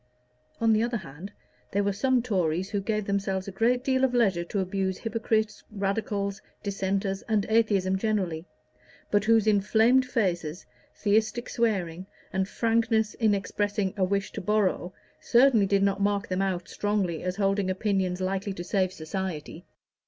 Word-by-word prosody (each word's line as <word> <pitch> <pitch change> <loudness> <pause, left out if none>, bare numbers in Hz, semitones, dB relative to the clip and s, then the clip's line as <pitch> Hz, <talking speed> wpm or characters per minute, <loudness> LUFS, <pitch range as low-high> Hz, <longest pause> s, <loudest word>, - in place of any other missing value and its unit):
On 225 -1 +4
the 215 - +3
other 235 +1 0
hand 170 +2 -9 0.4
there 200 +1 +2
were 200 0 0
some 250 +4 +1
Tories 185 -4 0
who 205 -2 -1
gave 215 0 -1
themselves 195 -1 -1
a - - -4
great 240 +6 +1
deal 260 -1 +1
of 255 -2 +2
leisure 195 -8 +2
to 200 - -4
abuse 190 0 -1
hypocrites, 220 -1 -1
Radicals, 200 -1 -2 0.2
Dissenters, 195 -1 -1
and 215 -2 +2
atheism 200 -4 +2
generally, 185 -6 -1 0.6
but 205 0 +2
whose 225 -1 +4
inflamed 220 +5 +4
faces, 175 -8 -1 0.3
theistic 220 +3 +1
swearing, 190 -6 -1 0.3
and 190 +1 0
frankness 225 -2 +1
in 215 -3 +2
expressing 200 0 -1
a 195 - 0
wish 195 +1 0
to - - -6
borrow, 195 -2 0 0.3
certainly 235 -4 +4
did 200 0 +2
not 200 0 +1
mark 200 0 +1
them 185 +1 0
out 185 -3 -1
strongly 200 -6 -1
as 180 0 -2
holding 195 -1 +1
opinions 185 -2 0
likely 195 +1 -2
to 175 - -6
save 185 0 0
society. 170 -1 -5
200 Hz, 155 wpm, -27 LUFS, 190-220 Hz, 0.6 s, On